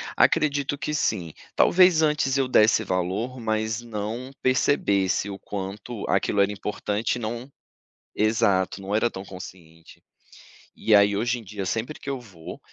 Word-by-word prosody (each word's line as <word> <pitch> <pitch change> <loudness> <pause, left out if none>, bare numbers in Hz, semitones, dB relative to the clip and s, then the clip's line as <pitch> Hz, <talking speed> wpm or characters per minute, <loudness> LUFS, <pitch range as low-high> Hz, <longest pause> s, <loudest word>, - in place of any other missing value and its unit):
Acredito 145 -3 +2
que 145 +2 -3
sim, 95 - -1 0.2
talvez 180 -3 +5
antes 150 -3 +1
eu 135 -1 +1
desse 110 -3 +4
valor, 95 +8 -2
mas 110 0 -1
não 115 +3 -5
percebesse 100 -7 +1
o 100 - -7
quanto 100 +3 -6
aquilo 100 - +1
era 100 +1 +2
importante 105 +2 -2
e - - -5
não 120 +4 -5 0.6
exato, 105 -3 +1
não 100 +2 -3
era 115 +2 +2
tão 95 +1 -8
consciente. 85 -3 -12 0.7
E 110 - +2
aí 100 0 +5
hoje 120 +3 0
em 115 - -11
dia, 100 -1 -6
sempre 115 +9 -3
que - - -10
eu 135 -2 -2
vou, 90 -9 -11
110 Hz, 150 wpm, -25 LUFS, 100-125 Hz, 0.7 s, talvez